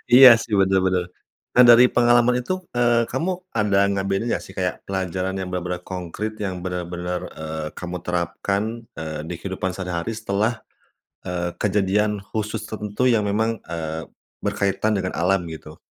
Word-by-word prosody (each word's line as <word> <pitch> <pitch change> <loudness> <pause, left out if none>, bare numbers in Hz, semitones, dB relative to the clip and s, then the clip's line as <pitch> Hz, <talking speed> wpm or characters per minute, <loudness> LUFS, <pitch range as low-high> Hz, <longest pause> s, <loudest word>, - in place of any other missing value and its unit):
Iya, 130 0 +11
sih, 115 -1 -6
bener 95 0 +4
bener. 90 -1 +2 0.5
Dan 125 - +8
dari 120 +1 +8
pengalaman 120 0 +4
itu, 185 +4 -2 0.2
eee, 120 -1 +3
kamu 165 +9 -1 0.2
ada 105 -3 +2
ngebedain 100 +3 -1
nggak - - -1
sih - - -12
kayak 90 -2 -3
pelajaran 95 0 -2
yang 95 - -4
bener-bener 90 0 -3
konkrit, 95 +4 -5
yang 95 -4 -4
bener-bener, 90 0 -3
eee, 80 0 -5
kamu 90 0 -4
terapkan, 90 +3 -1 0.3
eee, 80 -1 -5
di 85 - -5
kehidupan 95 -1 -3
sehari-hari 90 +2 -3
setelah, 110 +1 -1 0.6
eee, 90 -1 -2
kejadian 105 +1 +1
khusus 105 +2 -4
tertentu 105 +4 -1
yang 110 -4 +3
memang, 110 +3 0
eee, 80 -1 -4 0.4
berkaitan 100 +2 0
dengan 95 -1 -2
alam, 90 +2 +2
gitu? 80 -1 -10
95 Hz, 150 wpm, -23 LUFS, 90-110 Hz, 0.6 s, Iya